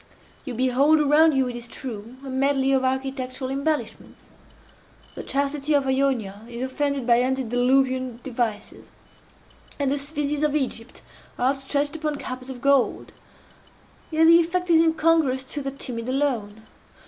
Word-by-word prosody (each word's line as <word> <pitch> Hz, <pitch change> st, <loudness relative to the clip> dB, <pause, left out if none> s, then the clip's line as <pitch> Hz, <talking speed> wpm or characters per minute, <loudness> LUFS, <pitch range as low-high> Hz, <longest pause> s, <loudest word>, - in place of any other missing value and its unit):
You 255 Hz, -4 st, -5 dB
behold 260 Hz, +5 st, +3 dB
around 300 Hz, +1 st, +4 dB
you, 265 Hz, -1 st, +2 dB
it 245 Hz, -, -5 dB
is 240 Hz, 0 st, -8 dB
true, 235 Hz, -2 st, -7 dB
a -, -, -7 dB
medley 270 Hz, 0 st, +1 dB
of 265 Hz, -1 st, +2 dB
architectural 260 Hz, 0 st, -2 dB
embellishments. 285 Hz, +3 st, -4 dB, 0.8 s
The -, -, -7 dB
chastity 285 Hz, +1 st, -1 dB
of 280 Hz, -1 st, +2 dB
Ionia 260 Hz, -7 st, 0 dB
is 240 Hz, +1 st, -5 dB
offended 280 Hz, 0 st, -2 dB
by 240 Hz, 0 st, +4 dB
antediluvian 255 Hz, 0 st, +1 dB
devices, 235 Hz, -5 st, -4 dB, 0.9 s
and 275 Hz, -2 st, +1 dB
the 285 Hz, -, 0 dB
sphynxes 290 Hz, 0 st, -3 dB
of 300 Hz, -1 st, +1 dB
Egypt 255 Hz, -4 st, -3 dB, 0.3 s
are 250 Hz, -, +2 dB
outstretched 280 Hz, +2 st, -1 dB
upon 305 Hz, -1 st, -2 dB
carpets 255 Hz, -2 st, -7 dB
of 255 Hz, -2 st, -8 dB
gold. 275 Hz, -1 st, +1 dB, 1.0 s
Yet 320 Hz, 0 st, +3 dB
the 335 Hz, +1 st, +8 dB
effect 350 Hz, +1 st, 0 dB
is 325 Hz, -, +6 dB
incongruous 320 Hz, -5 st, +2 dB
to 290 Hz, -, -3 dB
the 275 Hz, -, -3 dB
timid 250 Hz, -3 st, -5 dB
alone. 235 Hz, -6 st, -2 dB
270 Hz, 145 wpm, -24 LUFS, 255-290 Hz, 1.0 s, the